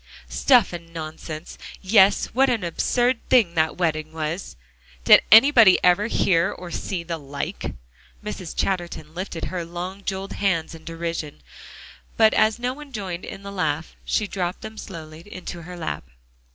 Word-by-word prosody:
"Stuff 245 -9 +4
and 170 -1 -8
nonsense! 155 0 -7 0.2
Yes, 195 0 +4
what 265 +2 +4
an 230 -6 0
absurd 240 +8 +1
thing 220 -9 +4
that 160 -1 +1
wedding 155 -3 -1
was. 160 - -4 0.5
Did - - +8
anybody 225 -3 +8
ever 185 +4 +4
hear 170 -5 +2
or 180 -1 -9
see 180 -4 -3
the 165 -1 -4
like!" 140 - -5 0.5
Mrs. 190 -5 -6
Chatterton 175 -4 -2
lifted 175 -2 -5
her 180 -2 -4
long 180 +4 -6
jeweled 195 0 -4
hands 170 -5 0
in 160 -1 -12
derision, 165 - -5 0.7
but 220 -1 +5
as 215 +1 +3
no 245 +1 -2
one 295 0 -12
joined 190 -6 -5
in 195 - -9
the 200 - -7
laugh, 160 -4 -2
she 215 - 0
dropped 185 -2 -3
them 220 - -8
slowly 160 -3 -9
into 175 -1 -7
her 175 +2 -9
lap. 165 - -4
180 Hz, 155 wpm, -23 LUFS, 165-205 Hz, 0.7 s, Did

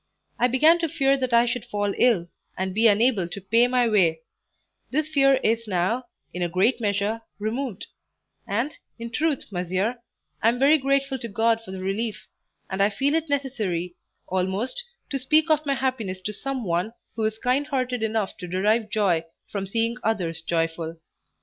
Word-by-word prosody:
I 245 - +4
began 310 +7 +5
to 330 -1 -1
fear 275 -1 +3
that 255 -2 -2
I 235 0 +5
should 245 -1 -2
fall 205 -1 -1
ill, 215 -9 +3 0.3
and 190 0 -2
be 225 +3 +5
unable 215 -3 +3
to 190 - -6
pay 230 +5 +3
my 245 -1 +2
way; 175 -7 +3 0.7
this 305 +3 0
fear 275 -3 +4
is 230 +1 +1
now, 205 +7 0 0.3
in 180 - -4
a 175 - 0
great 195 +9 +2
measure, 205 +2 0 0.2
removed; 220 +1 -3 0.6
and, 235 +9 0 0.3
in 230 0 -6
truth, 300 -4 -1
monsieur, 185 +6 -1 0.4
I 225 - +5
am 240 - 0
very 285 +4 +5
grateful 275 0 +1
to 235 - -5
God 225 +2 +1
for 225 - -14
the 190 0 -6
relief; 210 +3 -2 0.4
and 190 +1 -2
I 200 - +5
feel 275 +8 0
it 325 -1 0
necessary, 215 -12 -2 0.3
almost, 190 - -1 0.3
to 275 - 0
speak 310 +5 +3
of 305 -1 +2
my 275 - +2
happiness 225 -9 -2
to 210 - -3
some 265 +3 -4
one 180 +4 -1 0.2
who 225 - -2
is 220 0 -1
kind 255 +5 0
hearted 255 -4 -1
enough 220 -2 -1
to 180 - -7
derive 210 +5 +1
joy 195 -7 +2 0.3
from 195 -2 -3
seeing 230 +3 0
others 175 -7 -1
joyful. 165 0 -2
225 Hz, 180 wpm, -25 LUFS, 190-260 Hz, 0.7 s, began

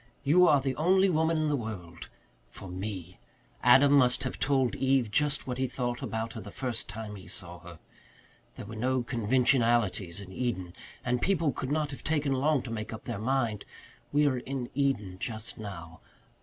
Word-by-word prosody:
"You 175 +6 +5
are 145 -3 +6
the 135 -1 -2
only 190 +4 +4
woman 160 0 +2
in 155 0 +1
the 150 - +2
world 95 -9 -7 0.4
for 95 - -10
me. 90 -1 -6 0.4
Adam 135 +4 +6
must 130 -2 +4
have 130 - -4
told 135 -3 +2
Eve 130 -4 +2
just 150 +4 +1
what 125 -1 -4
he 130 - +1
thought 120 -1 -3
about 115 0 -3
her 110 - -6
the 105 - -9
first 120 0 -3
time 105 +1 -6
he 95 - -12
saw 90 -2 -5
her. 85 -1 -12 0.8
There - - -8
were 110 +2 -8
no 125 +3 0
conventionalities 115 -5 +2
in 100 -2 -9
Eden 95 -6 -3 0.3
and 125 0 0
people 170 -6 +2
could 130 +1 -4
not 150 -1 0
have 135 - -9
taken 150 -3 +1
long 140 +1 +2
to 120 - -7
make 110 -1 -4
up 110 0 -7
their - - -4
minds. 115 -3 0 0.5
We 150 +1 +3
are 130 -3 +2
in 130 -1 -5
Eden 125 -10 0
just 110 +1 -3
now. 85 -6 -8
125 Hz, 185 wpm, -29 LUFS, 105-140 Hz, 0.8 s, are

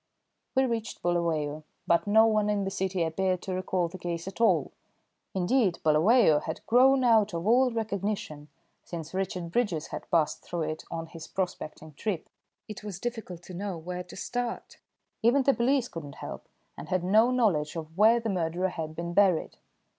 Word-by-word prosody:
We 265 0 +4
reached 230 -2 -3
Bulawayo, 160 -4 0 0.2
but 170 +3 +2
no 220 +2 +6
one 215 -2 +2
in 205 -1 +1
the 195 - -2
city 190 -2 -1
appeared 185 +3 -1
to 190 - -3
recall 185 -1 0
the 185 +2 -10
case 170 0 -4
at 195 - -6
all; 230 - +3 0.6
indeed, 190 +1 +2
Bulawayo 160 +2 +5
had 160 - -6
grown 260 +3 +5
out 220 -6 +4
of 165 +1 -3
all 250 +4 +5
recognition 200 -9 -3 0.4
since 165 -1 -7
Richard 185 -3 -3
Bridges 180 -9 0
had - - -7
passed 165 -4 +1
through 170 -2 -3
it 155 0 -4
on 165 -1 -4
his 165 -1 -10
prospecting 160 -4 -5
trip. 185 +2 -3 0.4
It 215 -1 -8
was 200 -3 -6
difficult 225 -8 -5
to 185 - -10
know 190 0 -4
where 180 +2 -5
to - - -12
start. 245 +3 -4 0.4
Even 245 +5 +4
the 275 - +4
police 255 +1 +2
could 165 -7 -7
not 140 - -10
help, - - -8 0.3
and - - -9
had 185 -1 0
no 215 +6 +5
knowledge 195 -13 +1
of 160 -1 -7
where 220 +4 +5
the 230 - -4
murderer 180 0 0
had 160 -3 -5
been 170 +1 -4
buried. 190 -4 +3
185 Hz, 180 wpm, -28 LUFS, 165-220 Hz, 0.6 s, no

